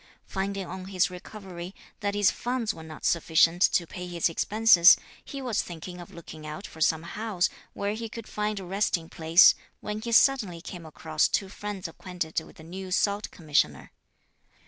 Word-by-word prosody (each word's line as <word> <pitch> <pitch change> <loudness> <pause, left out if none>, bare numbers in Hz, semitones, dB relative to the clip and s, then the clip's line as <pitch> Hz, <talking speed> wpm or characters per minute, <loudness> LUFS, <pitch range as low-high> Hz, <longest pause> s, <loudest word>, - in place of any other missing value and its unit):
Finding 195 0 -3
on 185 +1 -7
his 185 -1 +1
recovery, 180 -1 -9 0.2
that 205 0 -2
his 205 -2 +4
funds 240 -3 -2
were - - -11
not 160 -1 -9
sufficient 165 +1 +3
to 175 - +4
pay 180 +2 -7
his 175 -1 0
expenses, 200 0 +6 0.3
he 275 -1 -7
was 235 -4 0
thinking 175 +1 -8
of 175 - -11
looking 160 -2 -11
out 170 +7 -7
for 160 - -11
some 160 +1 +2
house 200 +1 -1 0.2
where 200 +1 -2
he 225 +1 -5
could 225 0 -8
find 210 0 -2
a 190 - -8
resting 180 -3 -1
place 165 +2 +6 0.3
when 210 0 -5
he 235 +1 -4
suddenly 225 -8 +4
came 170 -1 -9
across 155 0 0
two 195 - -1
friends 205 -2 -5
acquainted 170 -1 -4
with - - -15
the 160 - -13
new 185 +3 -7
Salt 200 +2 0
Commissioner. 150 - 0
185 Hz, 175 wpm, -27 LUFS, 170-205 Hz, 0.3 s, expenses